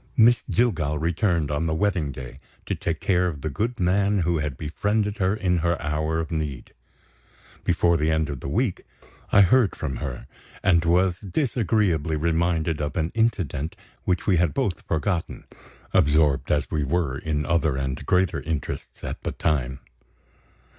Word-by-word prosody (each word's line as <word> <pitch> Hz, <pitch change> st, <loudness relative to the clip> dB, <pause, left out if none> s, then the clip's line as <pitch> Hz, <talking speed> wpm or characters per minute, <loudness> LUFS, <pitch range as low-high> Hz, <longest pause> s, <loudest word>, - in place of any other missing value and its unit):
Miss 120 Hz, +1 st, +6 dB
Jillgall 85 Hz, -11 st, +1 dB
returned, 85 Hz, -2 st, 0 dB
on 75 Hz, +3 st, 0 dB
the 80 Hz, -, 0 dB
wedding 85 Hz, -5 st, 0 dB
day, 65 Hz, 0 st, -9 dB, 0.3 s
to -, -, -2 dB
take 80 Hz, -1 st, -2 dB
care 90 Hz, -1 st, +2 dB
of 75 Hz, -5 st, -4 dB
the 80 Hz, -, -3 dB
good 115 Hz, -, -2 dB
man 100 Hz, +2 st, +2 dB
who 85 Hz, -1 st, +1 dB
had 75 Hz, -4 st, -3 dB
befriended 105 Hz, +7 st, -1 dB
her 95 Hz, +1 st, +2 dB
in 90 Hz, -4 st, +1 dB
her 85 Hz, +1 st, 0 dB
hour 80 Hz, +2 st, -1 dB
of 80 Hz, 0 st, -4 dB
need. 75 Hz, -5 st, -4 dB, 0.9 s
Before 85 Hz, -1 st, +3 dB
the 75 Hz, +1 st, +1 dB
end 80 Hz, -1 st, +1 dB
of 70 Hz, -3 st, -5 dB
the -, -, -7 dB
week, 100 Hz, -, 0 dB, 0.5 s
I 105 Hz, -, +7 dB
heard 105 Hz, +2 st, +4 dB
from 65 Hz, -6 st, -4 dB
her, 70 Hz, -5 st, -5 dB, 0.4 s
and 85 Hz, -3 st, +4 dB
was 90 Hz, +1 st, +3 dB
disagreeably 100 Hz, -, 0 dB
reminded 80 Hz, 0 st, 0 dB
of 75 Hz, +3 st, -3 dB
an 80 Hz, -1 st, 0 dB
incident 95 Hz, -, 0 dB, 0.3 s
which 90 Hz, -2 st, 0 dB
we 95 Hz, -4 st, +3 dB
had 85 Hz, -2 st, +1 dB
both 125 Hz, -10 st, -1 dB
forgotten, 85 Hz, +2 st, -1 dB, 0.5 s
absorbed 75 Hz, -1 st, +3 dB
as -, -, 0 dB
we 75 Hz, -2 st, 0 dB
were 70 Hz, -2 st, -1 dB
in 75 Hz, -2 st, -2 dB
other 80 Hz, -5 st, +1 dB
and 65 Hz, -1 st, -3 dB
greater 90 Hz, -2 st, +2 dB
interests, 80 Hz, -1 st, -5 dB
at -, -, -5 dB
the -, -, -3 dB
time. 65 Hz, -4 st, -1 dB
80 Hz, 165 wpm, -24 LUFS, 75-95 Hz, 0.9 s, I